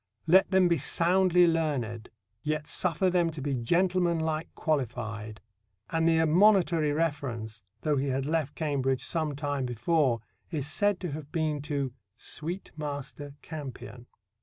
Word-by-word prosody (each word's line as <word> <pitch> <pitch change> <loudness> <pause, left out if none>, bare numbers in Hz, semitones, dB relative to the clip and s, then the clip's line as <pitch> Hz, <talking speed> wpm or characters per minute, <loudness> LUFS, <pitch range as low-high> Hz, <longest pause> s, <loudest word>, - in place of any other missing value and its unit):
Let 185 +4 +5
them 190 -1 +4
be 170 -3 +2
soundly 180 +4 +4
learned, 140 -10 -1 0.3
yet 155 0 -2
suffer 180 +3 +1
them 175 -2 +2
to 160 -1 -7
be 140 0 -1
gentlemanlike 170 +3 +1
qualified"; 115 - -2 0.5
and 165 0 +2
the 165 -1 +4
admonitory 165 -1 +4
reference, 135 -8 -2 0.2
though 150 -2 +1
he 135 +1 0
had 135 0 -1
left 155 -2 -1
Cambridge 135 -4 0
some 155 -4 -1
time 145 -1 -2
before, 125 +1 +1 0.3
is 150 -6 -2
said 205 +5 +1
to 175 -4 -3
have 150 0 -7
been 155 -3 -1
to 140 -4 -1 0.2
"sweet 170 +9 -5
master 145 -1 -6
Campion." 125 -5 -8
155 Hz, 135 wpm, -29 LUFS, 135-165 Hz, 0.5 s, Let